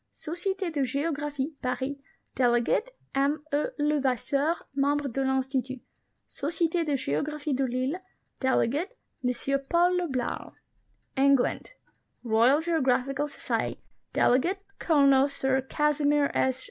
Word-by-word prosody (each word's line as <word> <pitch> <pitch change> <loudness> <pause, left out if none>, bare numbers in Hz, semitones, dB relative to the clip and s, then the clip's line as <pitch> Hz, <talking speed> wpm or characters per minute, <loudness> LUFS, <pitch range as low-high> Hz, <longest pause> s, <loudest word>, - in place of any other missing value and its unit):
Societe 365 +3 -3
de 295 -3 -1
Geographic 285 +1 -2
(Paris); 260 +2 -2 0.4
delegate, 245 - +2 0.2
M 280 +3 +1
E. 290 - +2
Levasseur, 290 +1 +1 0.2
Mem 280 +1 +2
bre 290 -1 -2
de 270 +3 -2
I'lnstitut. 265 0 -1 0.5
Societe 335 +3 -1
de 290 - +2
Geographic 285 - -2
de 270 +1 +1
Lille; 255 +7 -1 0.4
delegate, 290 - 0 0.3
M 255 +2 0
Paul 355 +1 +4
le 360 -1 0
Blau. 255 -4 -3 0.6
ENGLAND. 275 - +2 0.5
Royal 240 +6 +4
Geographical 275 -3 +1
Society; 290 - -3 0.3
delegate, 355 +11 +2 0.2
Colonel 275 -4 +4
Sir 265 -1 0
Casimir 295 -1 +2
S. 260 0 +1
280 Hz, 110 wpm, -28 LUFS, 265-305 Hz, 0.6 s, Paul